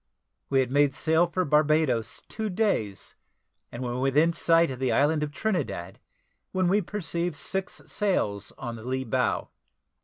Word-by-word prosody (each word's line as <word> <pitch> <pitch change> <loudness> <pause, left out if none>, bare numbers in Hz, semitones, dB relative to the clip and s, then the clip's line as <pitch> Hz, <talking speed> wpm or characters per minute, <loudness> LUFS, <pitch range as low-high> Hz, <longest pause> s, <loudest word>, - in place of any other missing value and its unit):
We 135 -1 +4
had 130 -1 -2
made 145 -1 +3
sail 160 +3 +3
for 185 +1 -1
Barbadoes 150 -5 +2
two 220 -1 -3
days, 180 - -1 0.6
and 120 +2 -6
were 120 0 -3
within 145 +6 +3
sight 165 -2 +3
of 130 - -6
the 130 -1 +1
island 150 +2 +3
of 150 -1 -2
Trinidad, 145 - -3 0.5
when 185 -1 +1
we 200 +4 +3
perceived 175 -3 -3
six 190 +6 -4
sail 180 - 0 0.2
on 120 -2 -5
the 110 - -10
lee 130 +2 -2
bow. 115 - 0
150 Hz, 155 wpm, -27 LUFS, 130-175 Hz, 0.6 s, We